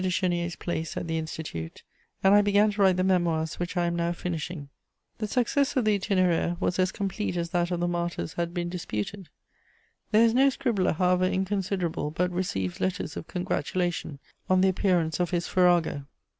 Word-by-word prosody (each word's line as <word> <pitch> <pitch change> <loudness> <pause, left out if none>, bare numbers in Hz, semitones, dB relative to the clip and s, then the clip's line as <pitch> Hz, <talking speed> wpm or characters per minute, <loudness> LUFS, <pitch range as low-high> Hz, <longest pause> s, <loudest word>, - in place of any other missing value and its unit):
de 185 - +1
Chénier's 175 -1 0
place 165 -2 -4
at - - -3
the 160 0 -1
Institute, 155 - -6 0.4
and 195 +1 +6
I 205 - +7
began 205 +1 +3
to 205 0 -3
write 190 -2 +5
the 185 - +2
Memoirs 170 -4 +1
which 175 +1 -3
I 175 - +2
am 170 0 -1
now 170 0 0
finishing. 170 -3 -5
[Sidenote: - - -31
The - - -53
Itinéraire.] - - -48
The 215 - -2
success 255 +5 +1
of 255 -4 +2
the 210 -2 +3
Itinéraire 180 -3 +1
was 180 - -1
as 185 0 +2
complete 195 -1 -3
as 170 -1 -2
that 175 0 +1
of 175 -1 -1
the 175 - +1
Martyrs 175 -2 -2
had 170 0 -2
been 175 -1 -2
disputed. 175 - -5 0.8
There 220 +1 +5
is 225 - +3
no 270 +3 +5
scribbler, 230 -7 0
however 180 +1 +2
inconsiderable, 190 -4 -1
but 180 +4 -1
receives 95 - -2
letters 185 +1 -2
of - - -6
congratulation 175 -4 -2 0.3
on 185 0 +4
the 190 - +5
appearance 180 -4 +1
of 175 -1 +1
his 175 -1 -1
_farrago. 175 -6 +2
180 Hz, 200 wpm, -27 LUFS, 170-190 Hz, 0.8 s, I